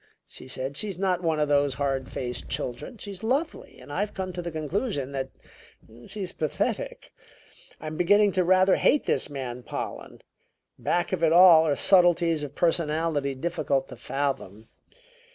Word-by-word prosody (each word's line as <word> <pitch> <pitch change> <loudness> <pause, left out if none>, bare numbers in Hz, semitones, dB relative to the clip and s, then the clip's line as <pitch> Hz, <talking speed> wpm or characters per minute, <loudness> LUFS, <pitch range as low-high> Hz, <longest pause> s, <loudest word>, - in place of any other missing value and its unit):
she - - -12
said. 130 +2 -4
"She's 200 +1 -3
not 185 -2 0
one 160 -3 0
of 150 - +2
those 145 -2 +2
hard 135 -2 -2
faced 125 -1 -4
children; 125 - -5
she's 200 -3 -8
lovely 280 +8 -2
and 145 - -10
I've 205 +5 -2
come 185 -1 -4
to 175 - -4
the 175 - -4
conclusion 155 - -3
that 135 -1 -3 0.8
she's 195 -2 -5
pathetic. 155 -2 -3 0.7
I'm 155 0 -6
beginning 205 +4 +4
to 185 0 +1
rather 185 +2 +4
hate 295 - +3
this - - 0
man 130 -3 -5
Pollen. - - -7 0.6
Back 175 0 0
of 175 -3 -1
it 160 - +4
all 170 -2 +8
are 145 - +2
subtleties 175 -3 +4
of 145 -1 -7
personality 160 -4 0
difficult 140 -2 -1
to - - -9
fathom. 135 -7 -4
160 Hz, 155 wpm, -26 LUFS, 140-185 Hz, 0.8 s, all